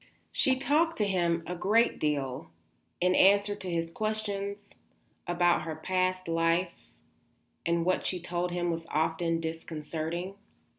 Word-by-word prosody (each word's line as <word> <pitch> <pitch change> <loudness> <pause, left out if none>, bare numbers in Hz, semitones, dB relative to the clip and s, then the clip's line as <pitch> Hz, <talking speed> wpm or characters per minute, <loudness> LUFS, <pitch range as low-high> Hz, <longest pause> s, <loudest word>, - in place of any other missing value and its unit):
She 265 -2 +2
talked 305 +5 +2
to 210 - +2
him 170 -4 +1
a 180 - -4
great 215 +7 +2
deal, 140 -3 -1 0.5
in 180 +1 +3
answer 200 +2 +5
to 190 -2 -6
his 165 -1 -1
questions, 205 -1 -2 0.7
about 175 0 +3
her 160 0 -4
past 185 +2 -1
life, 165 +1 0 0.8
and 170 0 +1
what 185 0 +1
she 180 - -1
told 175 +1 -2
him 175 0 0
was 165 0 -4
often 165 +2 0
disconcerting. 165 +2 -4
175 Hz, 135 wpm, -29 LUFS, 165-195 Hz, 0.8 s, answer